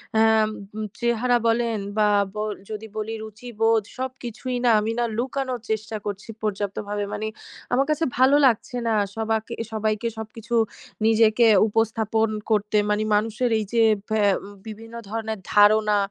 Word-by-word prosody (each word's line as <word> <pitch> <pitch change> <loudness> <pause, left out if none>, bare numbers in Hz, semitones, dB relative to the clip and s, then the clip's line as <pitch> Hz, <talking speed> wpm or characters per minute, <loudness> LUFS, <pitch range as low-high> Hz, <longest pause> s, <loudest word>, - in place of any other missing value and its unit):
অ্যা 220 - +5 0.2
আম 215 - 0 0.5
চেহারা 240 +1 +2
বলেন 230 -1 +1 0.2
বা 210 -1 +4 0.3
ব - - -25 0.3
যদি 215 0 -6
বলি 215 +1 -3
রুচিবোধ 225 0 0 0.2
সবকিছুই 255 -1 -5
না - - +5
আমি 215 +2 -1
না 240 - +2
লুকানোর 260 0 -2
চেষ্টা 220 0 -2
করছি 205 +1 -5
পর্যাপ্তভাবে। 205 0 -3
মানে 215 +1 -3 0.5
আমার 265 +3 +3
কাছে 305 +1 +1
ভালো 260 +3 +5
লাগছে 250 0 +1
না। 225 - +2 0.2
সবাকে 220 +1 -2 0.2
সবাইকে 215 +1 -1
সবকিছু 220 +1 -5 0.5
নিজেকে 225 +1 +4 0.2
উপস্থাপন 225 0 +1 0.2
করতে 210 0 +2
মানে 210 +1 +1
মানুষের 225 +3 0
এই 215 - -3
যে 230 -1 +4 0.3
ভ্যা 215 -1 +1 0.2
ম - - -9 0.2
বিভিন্ন 225 +2 -9
ধরনের 220 -1 -3
ধারণা, 210 0 +5
220 Hz, 140 wpm, -24 LUFS, 215-235 Hz, 0.5 s, অ্যা